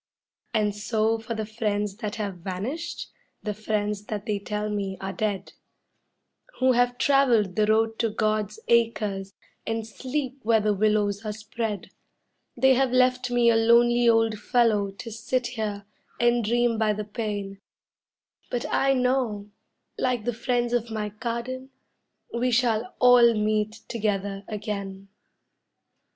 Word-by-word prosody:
And 210 -3 +1
so 220 +2 0
for 225 +1 -5
the 220 -1 -3
friends 210 -2 -2
that 215 -2 -4
have 205 -4 -4
vanished, 215 - -5 0.3
the 210 - -2
friends 210 -1 -2
that 210 -2 -5
they 210 -2 -1
tell 210 +1 -3
me 200 -2 -3
are 195 0 -4
dead, 205 -3 -2 1.0
Who 260 0 +4
have 245 0 +2
traveled 245 -9 +3
the 210 -1 +2
road 225 +1 +2
to 230 - +2
God's 215 -1 -1
Acres 210 -4 +1 0.3
and 225 -1 -2
sleep 265 +4 -4
where 225 -1 +3
the 210 0 +1
willows 205 0 +1
are 215 - -3
spread; 215 -1 -5 0.7
They 265 +2 +5
have 260 0 +2
left 255 0 +3
me 240 -1 +4
a - - +3
lonely 235 +1 +5
old 225 -2 +3
fellow 220 -5 +2
to 200 +4 -9
sit 245 +3 -1
here 215 -4 -4 0.3
and 240 0 +3
dream 235 +1 +1
by 215 -1 +2
the 210 0 -4
pane, 205 -2 -4 0.9
But 245 - -2
I 270 0 +3
know, 250 -5 0 0.5
like 245 -4 0
the 240 - 0
friends 240 +1 -1
of 240 -1 0
my 215 -1 -3
garden, 235 +4 -5 0.6
we 240 +2 +1
shall 235 -1 +1
all 245 -2 +7
meet 215 +1 0
together 200 -3 -2
again. 200 -2 -5
220 Hz, 140 wpm, -26 LUFS, 210-240 Hz, 1.0 s, all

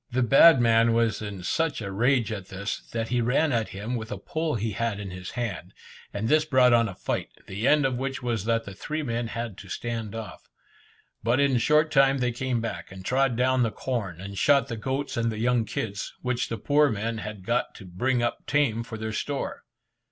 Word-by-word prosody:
The 130 0 +1
bad 135 +5 +7
man 115 -1 +4
was 115 -3 +1
in 100 -3 -6
such 165 - 0
a 100 -3 -5
rage 115 +2 +2
at 100 -4 -5
this, 100 +2 -4
that 115 -1 -2
he 125 -1 +1
ran 135 +6 +2
at 115 -3 0
him 105 +5 -5
with 110 -1 -5
a 105 - -3
pole 155 +9 -2
he 110 0 -2
had 115 -1 -2
in 100 -2 -6
his 90 0 -7
hand, 115 -8 -4 0.4
and 105 +2 -3
this 155 +3 +4
brought 130 -5 +4
on 115 -2 +4
a 95 - -8
fight, - - -3 0.2
the 100 +6 -2
end 150 -1 +4
of 130 -2 0
which 135 -1 -3
was 115 -5 -1
that 115 0 +1
the 100 - -8
three 155 +10 -4
men 120 -2 -2
had 115 -3 -5
to 95 - -11
stand 115 0 -4
off. 115 -1 -8 0.7
But 120 +4 +2
in 140 -2 +3
a - - +2
short 150 +5 +3
time 135 -2 +4
they 125 -2 0
came 125 0 -1
back, 115 - -5
and 95 0 -10
trod 135 -1 +2
down 130 +1 +2
the 115 - +2
corn, 110 -8 -4
and 100 +1 -6
shot 140 -1 +4
the 115 - -3
goats 130 +6 -3
and 115 0 +1
young 115 +1 +1
kids, 105 -1 -4
which 125 -1 -1
the 115 - -3
poor 145 +3 +3
men 110 0 -2
had 105 -3 -7
got 120 +3 0
to 100 - -11
bring 120 +8 0
up 120 - -2
tame 135 -6 +2
for 115 -1 -7
their 110 0 -4
store. 140 +5 -3
115 Hz, 225 wpm, -26 LUFS, 110-130 Hz, 0.7 s, bad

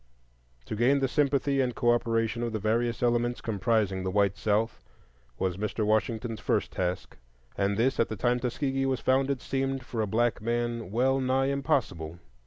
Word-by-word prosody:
To - - -4
gain 125 +6 +3
the 135 -1 +1
sympathy 140 -1 +1
and 125 -2 -1
cooperation 115 -1 +1
of 120 -1 -2
the - - 0
various 115 +3 0
elements 120 0 +1
comprising 105 -2 0
the 95 - -1
white 100 0 +2
South 105 +3 0 0.6
was 95 -1 -1
Mr. 105 +1 -2
Washington's 110 +1 0
first - - 0
task; 90 0 -3 0.4
and 100 0 0
this, 130 +4 +1
at 115 - +2
the 110 - -3
time 120 +4 +1
Tuskegee 135 +2 -1
was 130 -1 0
founded, 135 0 +1
seemed, 135 -1 -2
for 115 -4 -3
a 105 - 0
black 115 +2 +1
man, 120 -2 -2
well 130 +5 +2
nigh 135 +1 +1
impossible. 85 - -1
120 Hz, 170 wpm, -28 LUFS, 110-130 Hz, 0.6 s, gain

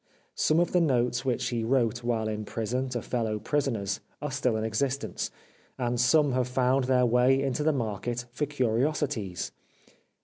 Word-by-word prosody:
Some 155 +2 +2
of 175 - +2
the 180 - +3
notes 125 -4 +1
which 125 -1 0
he 115 -2 -1
wrote 120 -1 +1
while 115 -2 0
in 110 0 -3
prison 120 +5 -2
to 120 -2 -3
fellow 115 -3 -1
prisoners 110 -5 -1 0.2
are 150 -1 -4
still 130 -3 0
in 110 - -2
existence, 130 +5 -1 0.5
and 120 -1 -1
some 145 +3 +4
have 125 -1 +1
found 130 +1 +2
their 125 -1 +3
way 125 +3 +4
into 135 +1 -1
the 155 +1 +3
market 120 -1 -3
for 145 +4 -2
curiosities. 130 - -1
125 Hz, 165 wpm, -28 LUFS, 115-135 Hz, 0.5 s, some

